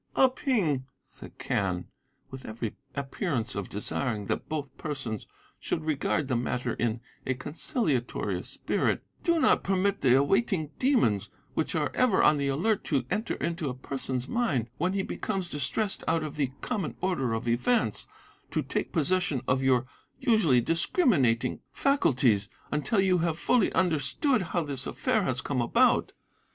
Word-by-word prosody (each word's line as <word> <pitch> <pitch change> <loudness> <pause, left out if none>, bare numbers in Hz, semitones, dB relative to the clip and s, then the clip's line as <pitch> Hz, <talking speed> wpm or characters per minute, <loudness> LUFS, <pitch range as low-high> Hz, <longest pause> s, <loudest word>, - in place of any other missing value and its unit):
"'Ah 265 - +6
Ping,' 195 - 0
said - - -14
Quen, 90 -3 -1 0.5
with 130 -1 -8
every 110 0 -5 0.2
appearance 135 - -2
of 100 -2 -4
desiring 105 +1 -2
that - - -3
both 150 -3 -4
persons 135 -8 -5 0.3
should 160 - -2
regard 150 -1 0
the 130 - 0
matter 125 0 -1
in 115 0 -1 0.3
a 130 - +1
conciliatory 140 - -1
spirit, - - -1 0.2
'do 340 -2 +3
not - - +4
permit 195 +1 +1
the 125 -2 +5
awaiting 160 - +2
demons, 235 - +2 0.2
which - - -1
are - - 0
ever 255 -6 +3
on 150 - +5
the 140 -1 0
alert 180 +10 +1
to 135 -5 0
enter 220 +2 -1
into 170 -3 -2
a 125 - -4
person's 130 -1 -4
mind 140 - 0
when 180 +4 +1
he 195 -1 0
becomes 190 -4 -3
distressed 150 +9 -1
out 165 -1 +2
of 155 - -5
the 140 -4 0
common 200 - -2
order 135 -11 0
of 115 +2 -3
events, 130 - +1 0.4
to - - -1
take - - -2
possession 170 -3 +1
of 130 +1 +2
your 130 -2 +3 0.3
usually 220 - +4
discriminating 140 - +2
faculties 125 - +2 0.2
until 150 +9 +1
you 185 -2 +3
have 165 -1 0
fully 230 +3 +2
understood 185 - +2
how 175 -1 -1
this 140 -3 -3
affair 250 -4 +1
has 130 -8 0
come 140 -4 -1
about. 120 - +3
145 Hz, 155 wpm, -28 LUFS, 125-190 Hz, 0.5 s, Ah